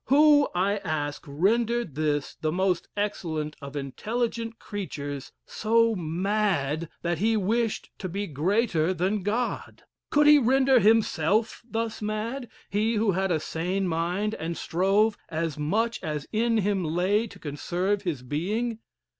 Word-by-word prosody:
Who, 290 +1 +6
I 195 +3 +2
ask, 155 -6 -3
rendered 225 - +1
this 145 -1 -1
the 155 - 0
most 180 0 0
excellent 160 -7 -2
of 140 +1 -8
intelligent 225 - -3
creatures 145 -9 -6
so 230 +1 +2
mad, 170 -3 0
that 170 -1 -1
he 220 +2 +2
wished 220 +3 0
to 185 - -4
be 200 +4 -3
greater 180 - +1
than 190 +4 0
God? 220 +6 -2 0.3
Could 295 0 +4
he 295 0 +8
render 265 +1 +4
himself 215 -2 +2
thus 225 -1 -3
mad 225 +4 -3 0.2
he 215 +3 +1
who 215 -1 +2
had 190 +1 0
a 160 - +2
sane 180 +5 -2
mind, 175 +6 -1
and 165 -4 -4
strove 200 +5 +2
as 160 -2 -2
much 220 +10 0
as 150 -4 -3
in 230 +1 +2
him 200 -2 +1
lay 185 +7 +1
to - - -13
conserve 175 +7 -2
his 165 -10 -3
being? 210 - -2
195 Hz, 140 wpm, -27 LUFS, 160-225 Hz, 0.3 s, he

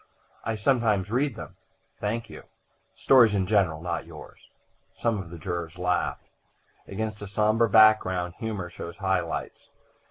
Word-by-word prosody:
"I 115 - -2
sometimes 110 -4 +1
read 130 +1 0
them." - - -10 0.4
"Thank 115 +2 -2
you." - - -11 0.5
"Stories 120 -6 +5
in 95 -2 +1
general 90 -6 +1
not 85 -1 -3
yours." - - -13 0.5
Some 115 -3 0
of 85 - -11
the 85 - -9
jurors 85 0 -5
laughed. 90 0 -1 0.6
Against 105 +1 -4
a 105 - -6
sombre 110 +3 +2
background 95 -5 +4
humor 105 -6 -4
shows 85 0 -8
high 95 -3 +1
lights. 85 - -6
105 Hz, 145 wpm, -26 LUFS, 90-110 Hz, 0.6 s, Stories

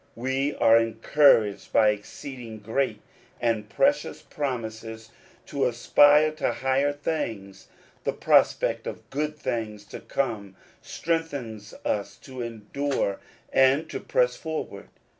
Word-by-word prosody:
We 130 +4 -1
are 115 0 +6
encouraged 115 -2 +3
by 110 -1 +5
exceeding 115 +2 -6
great 120 +6 -1 0.4
and 115 -3 -1
precious 285 - +1
promises 110 -5 -5 0.3
to 140 - 0
aspire 145 +5 +5
to 155 - 0
higher 135 +2 +1
things. 115 -11 -4 0.4
The - - 0
prospect - - +2
of - - -7
good 150 +2 -2
things 110 -6 -4
to - - -7
come 105 -8 -3 0.3
strengthens 140 -11 -4
us 100 -1 -2
to 130 -2 -9
endure, 115 0 -2 0.3
and 135 +4 +4
to - - -4
press - - +1
forward. 160 -1 -6
125 Hz, 115 wpm, -26 LUFS, 110-145 Hz, 0.4 s, are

